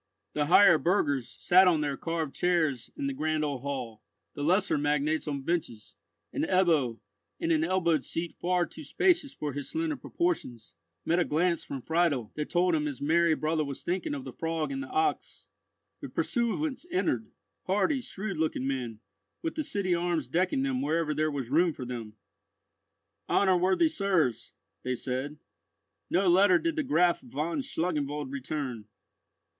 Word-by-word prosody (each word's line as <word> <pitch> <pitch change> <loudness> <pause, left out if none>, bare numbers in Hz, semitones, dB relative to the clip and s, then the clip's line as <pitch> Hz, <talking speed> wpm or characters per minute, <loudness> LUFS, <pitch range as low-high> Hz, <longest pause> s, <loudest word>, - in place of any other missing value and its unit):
The 150 -1 0
higher 175 -1 +7
burghers 145 - +1
sat 185 +1 +4
on 165 -4 +3
their 145 -2 -1
carved 160 -2 -3
chairs 160 -8 +1
in 285 - -3
the 275 - -1
grand 155 -8 0
old 140 -4 -3
hall, 125 -6 -5 0.3
the - - -7
lesser 185 +6 +2
magnates 150 +2 0
on 140 -2 -3
benches, 135 -10 -3 0.4
and - - -1
Ebbo, 160 -10 +2 0.4
in 335 0 0
an 320 -1 +3
elbowed 170 - +1
seat 165 0 -4
far 180 0 +1
too - - -11
spacious 335 -7 +2
for 150 -2 -5
his 145 0 -5
slender 320 -1 -1
proportions, 280 - -3 0.3
met 170 +2 +2
a - - +4
glance 170 +2 +1
from 135 -3 -6
Friedel 160 -9 +1
that 150 0 -4
told 180 0 +2
him 150 -1 +1
his 140 -4 -5
merry 165 +2 +3
brother 155 0 0
was 140 -2 -6
thinking 190 - -2
of 275 - -6
the - - -8
frog 165 - -2
and 270 0 -3
the 280 - -6
ox. 390 0 -1 0.6
The - - -6
pursuivants 255 +4 -1
entered—hardy, 315 -5 -1
shrewd 200 -4 -5
looking 155 -4 -1
men, 125 -5 -3 0.4
with 330 - -2
the 310 - -2
city 200 -8 -1
arms 170 -5 0
decking 170 -1 +1
them 130 -1 -1
wherever 155 +2 0
there 155 +1 +1
was 135 -4 -4
room 170 +2 +3
for 130 - -7
them. 115 -3 -6 1.2
"Honour 190 -2 +4
worthy 190 - +3
sirs," 185 - 0 0.3
they 130 0 -2
said, 130 +4 -4 0.7
"no 190 +2 +2
letter 185 +1 +6
did 330 - -1
the 315 - +1
Graf 180 - +3
von 150 - -3
Schlangenwald 150 - -2
return." 135 -5 -4
165 Hz, 165 wpm, -29 LUFS, 140-185 Hz, 1.2 s, higher